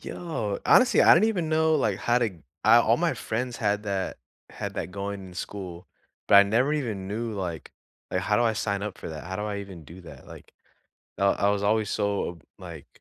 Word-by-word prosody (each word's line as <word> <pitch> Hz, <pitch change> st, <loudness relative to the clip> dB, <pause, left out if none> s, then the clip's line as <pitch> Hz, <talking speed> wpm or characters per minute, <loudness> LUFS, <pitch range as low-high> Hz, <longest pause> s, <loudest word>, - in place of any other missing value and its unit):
Yo, 115 Hz, -, -4 dB
honestly, 255 Hz, -1 st, +5 dB
I -, -, +8 dB
don't -, -, +4 dB
even 190 Hz, -8 st, 0 dB
know 160 Hz, 0 st, +2 dB
like 110 Hz, -10 st, 0 dB
how 120 Hz, +2 st, +2 dB
to 120 Hz, -3 st, 0 dB, 0.3 s
I 110 Hz, +2 st, +7 dB
all 115 Hz, 0 st, +3 dB
my 170 Hz, +2 st, 0 dB
friends 120 Hz, +2 st, -3 dB
had 105 Hz, -2 st, 0 dB
that 100 Hz, -2 st, -3 dB, 0.3 s
had -, -, -6 dB
that 85 Hz, -, -4 dB
going 100 Hz, +1 st, -5 dB
in 90 Hz, -, -13 dB
school, 90 Hz, -1 st, -7 dB, 0.4 s
but -, -, +7 dB
I 100 Hz, -, +10 dB
never 120 Hz, +8 st, +1 dB
even 110 Hz, -10 st, -3 dB
knew 115 Hz, +3 st, -3 dB
like 90 Hz, -7 st, -5 dB, 0.4 s
like 95 Hz, -, 0 dB
how 105 Hz, +2 st, +1 dB
do 120 Hz, -, +2 dB
I 115 Hz, -, +2 dB
sign 100 Hz, -2 st, -2 dB
up 105 Hz, -2 st, -5 dB
for -, -, -8 dB
that? 80 Hz, -1 st, -7 dB
How 95 Hz, +2 st, -5 dB
do 105 Hz, -, -4 dB
I 105 Hz, -1 st, -3 dB
even 95 Hz, -5 st, -9 dB
do 85 Hz, +5 st, -12 dB
that? 85 Hz, -, -13 dB
Like, -, -, -13 dB, 0.7 s
I 100 Hz, -, +1 dB, 0.2 s
I -, -, +4 dB
was 100 Hz, 0 st, 0 dB
always 105 Hz, 0 st, +1 dB
so 100 Hz, -1 st, -1 dB
ob 85 Hz, -3 st, -10 dB, 0.2 s
like -, -, -10 dB
105 Hz, 220 wpm, -26 LUFS, 95-120 Hz, 0.7 s, I